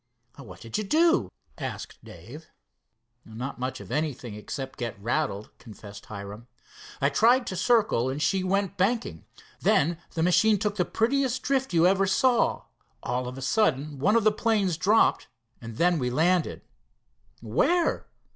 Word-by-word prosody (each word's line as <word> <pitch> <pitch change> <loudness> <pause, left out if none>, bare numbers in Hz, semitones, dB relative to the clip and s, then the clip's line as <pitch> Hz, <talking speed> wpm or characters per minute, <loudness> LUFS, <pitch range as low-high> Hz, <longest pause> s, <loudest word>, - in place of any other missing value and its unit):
"What 100 -10 -12
did 115 - -4
you - - -2
do?" 330 - +2 0.3
asked - - -7
Dave. - - -12 0.7
"Not 120 +5 -7
much 130 +1 -4
of - - -11
anything, 145 -7 -3
except 130 +5 -7
to 120 - -1
get 110 -3 -7
rattled," 110 -2 -2
confessed 105 -2 -12
Hiram. 100 +3 -9 0.5
"I 140 - +2
tried 240 - +3
to 185 - -4
circle, 195 - +2
and 135 +2 -4
she 185 +5 +1
went 195 0 -1
banking. 190 - -1 0.3
Then 165 +3 +2 0.2
the 160 - 0
Machine 210 +5 +4
took 210 0 -2
the 180 - +1
prettiest 255 +4 0
drift 265 -3 0
you 170 -1 +3
ever 195 +1 +3
saw. 240 +5 +2 0.4
All 125 +1 -2
of 125 +1 -7
a 135 - -6
sudden 145 - 0
one 205 +10 +2
of 230 - +3
the 215 - +5
planes 210 -5 0
dropped 205 +7 +2 0.3
and 115 -1 -9
then 175 -1 +2
we 125 -2 -1
landed." 165 +6 +1 0.8
"Where?" 280 - 0
170 Hz, 155 wpm, -26 LUFS, -, 0.8 s, the